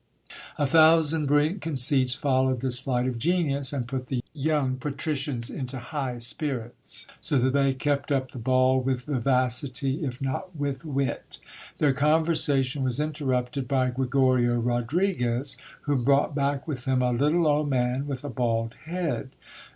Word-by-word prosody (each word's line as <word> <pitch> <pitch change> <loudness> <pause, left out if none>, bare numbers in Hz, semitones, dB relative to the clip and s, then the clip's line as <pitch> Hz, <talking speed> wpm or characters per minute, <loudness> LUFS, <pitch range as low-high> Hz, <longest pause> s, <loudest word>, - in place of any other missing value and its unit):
'* - - -12
A 145 - +1
thousand 160 0 +4
brilliant 150 +6 +2
conceits 135 -4 +3
followed 130 -2 +1
this 125 -2 +2
flight 125 -2 -1
of 125 -2 -2
genius, 140 -3 +1
and 130 -5 -3
put 130 -1 -4
the 125 -2 -2
young 145 -3 0
patricians 140 -3 -3
into 130 0 -5
high 130 0 -4
spirits, 120 0 -3 0.2
so 145 - +1
that 130 +1 +2
they 135 -1 +2
kept 140 +1 -1
up 130 -2 0
the 125 - -8
ball 130 +2 +3
with 130 -1 -1
vivacity, 130 +2 0
if 125 -3 -4
not 140 +7 -4
with 140 -2 -3
wit. 140 -5 -3 0.4
Their 145 -3 +3
conversation 145 -2 +2
was 130 0 0
interrupted 135 -4 -2
by 130 -1 +1
Gregorio 130 -1 +2
Rodriguez, 125 +2 0 0.3
who 145 -2 0
brought 140 +4 +2
back 140 0 -1
with 130 -5 -5
him 130 -1 +1
a 125 - +2
little 150 +7 +2
old 150 -1 +2
man 130 +1 0
with 135 -2 -4
a 145 - -5
bald 115 -2 -1
head. 170 -5 -3
135 Hz, 155 wpm, -26 LUFS, 125-145 Hz, 0.4 s, thousand